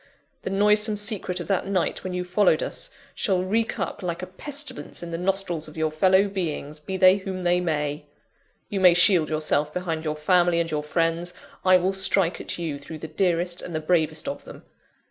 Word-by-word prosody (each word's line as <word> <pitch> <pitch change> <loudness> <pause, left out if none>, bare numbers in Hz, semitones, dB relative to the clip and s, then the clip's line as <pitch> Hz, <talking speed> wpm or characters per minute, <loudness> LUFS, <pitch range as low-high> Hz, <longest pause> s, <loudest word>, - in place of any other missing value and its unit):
The - - -4
noisome 210 +2 +3
secret 205 -3 -2
of - - -5
that 195 -1 0
night 190 -3 -1
when 185 - -4
you 180 0 -2
followed 195 - +2
us, - - -3 0.2
shall 185 -4 0
reek 220 +4 0
up - - -4
like 175 -1 -3
a - - -2
pestilence 270 - -5
in 170 - -6
the 165 - -2
nostrils 180 -4 -1
of 155 - -12
your 160 -1 0
fellow 190 +5 +4
beings, 155 -6 -4
be 190 +5 -5
they 185 +1 +6
whom 190 -1 -5
they 175 0 +3
may. 150 -3 -2 0.6
You 200 - -3
may 180 -2 +7
shield 175 -2 +5
yourself 155 -1 0
behind 165 -2 -3
your 155 -1 -2
family 175 +2 +3
and 165 -1 -1
your 150 -1 -1
friends 165 +3 -1 0.3
I 185 0 +6
will 185 +2 0
strike 190 -2 +1
at - - -4
you 160 -5 -4
through 155 +3 -9
the 160 - -7
dearest 175 +1 0
and 175 - -6
the - - 0
bravest 155 -1 0
of 280 - -4
them! - - -12
180 Hz, 205 wpm, -25 LUFS, 160-190 Hz, 0.6 s, may